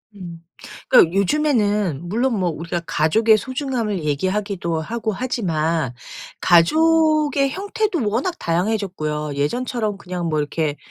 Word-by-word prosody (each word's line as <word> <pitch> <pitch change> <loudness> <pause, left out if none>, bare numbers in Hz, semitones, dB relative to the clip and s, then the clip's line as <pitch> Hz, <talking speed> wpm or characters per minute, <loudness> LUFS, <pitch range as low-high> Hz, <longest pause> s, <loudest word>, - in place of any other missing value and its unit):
음. 175 -4 -9 0.5
그니까 165 - +6
요즘에는 205 - +1
물론 235 +3 0
뭐 180 -2 +1
우리가 170 +2 -4
가족의 215 +9 +3
소중함을 250 - -3
얘기하기도 180 +2 -1
하고 220 +6 -3
하지만 165 - -1 0.5
가족의 305 - +3
형태도 390 - -2
워낙 275 - -1
다양해졌고요. 170 -5 -2
예전처럼 215 - -2
그냥 180 -3 -5
뭐 155 -1 0
이렇게 150 0 -2
200 Hz, 305 characters per minute, -21 LUFS, 165-255 Hz, 0.5 s, 그니까